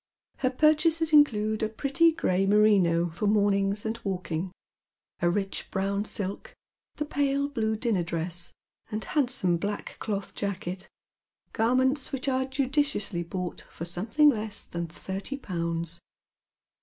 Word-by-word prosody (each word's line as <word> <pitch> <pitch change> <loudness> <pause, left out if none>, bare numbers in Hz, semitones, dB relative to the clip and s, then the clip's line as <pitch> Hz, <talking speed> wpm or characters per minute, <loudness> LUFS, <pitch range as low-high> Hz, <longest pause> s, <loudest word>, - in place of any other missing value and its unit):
Her 255 - +1
pur 305 +4 +5
chases 320 0 +1
include 215 -8 +4
a 215 - +1
pretty 280 +8 +3
gray 195 - +1
merino 195 -5 +4
for 195 +6 -2
mornings 200 0 +2
and 220 +1 -2
walking, 180 -2 -3 0.7
a 175 - +3
rich 195 +2 -2
brown 200 +2 -1
silk, 205 - -4 0.4
the 300 - -2
pale 280 -1 0
blue 220 -6 -1
dinner 220 -4 0
dress, 170 +1 -3 0.4
and 215 -1 -3
handsome 245 - +1
black 205 +4 -4
cloth 200 -3 -3
jacket, 185 -2 -4 0.7
garments 260 +4 +2
which 270 0 -3
are 260 -1 +1
judiciously 265 - 0
bought 180 +1 -5
for 165 - -7
some 175 +4 -3
thing 300 +5 +6
less 215 -3 0
tljun 170 -1 -4
thirty 195 - -5
pounds. 170 - -3
210 Hz, 135 wpm, -28 LUFS, 185-265 Hz, 0.7 s, thing